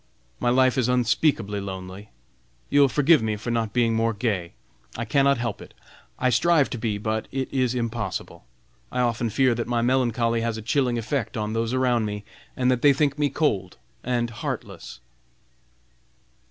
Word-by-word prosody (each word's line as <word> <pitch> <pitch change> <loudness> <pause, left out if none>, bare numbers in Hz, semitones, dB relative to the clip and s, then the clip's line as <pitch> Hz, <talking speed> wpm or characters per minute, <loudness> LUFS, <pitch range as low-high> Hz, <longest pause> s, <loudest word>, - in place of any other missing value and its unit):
My 120 - +1
life 130 +1 +3
is 125 -1 +1
unspeakably 120 -4 +1
lonely. 95 +1 -7 0.6
You 145 - +5
will 140 - +5
forgive 150 +1 +4
me 110 -1 -1
for 105 +3 -5
not 115 -2 -1
being 115 -1 +2
more 115 0 +1
gay; 100 -6 -2 0.4
I 120 - -3
cannot 140 +4 +3
help 115 -3 -3
it! - - -13 0.4
I 130 0 +1
strive 155 +3 +3
to 120 - -4
be, 110 -3 -1
but 110 +1 -2
it 135 0 -3
is 130 -2 +1
impossible. 115 -4 -4 0.5
I 125 - -2
often 120 -1 0
fear 125 +3 +2
that 115 0 -3
my 120 -1 0
melancholy 120 -2 +1
has 115 -1 -2
a 110 - -7
chilling 125 0 +1
effect 115 +1 -2
on 105 0 -2
those 115 0 -1
around 125 -3 +1
me, 105 -1 -4 0.3
and 125 0 +2
that 125 -1 0
they 145 -1 +6
think 145 0 0
me 145 -1 +2
cold 105 - -1 0.3
and 120 -1 -1
heartless!" 115 - -6
120 Hz, 175 wpm, -24 LUFS, 110-130 Hz, 0.6 s, they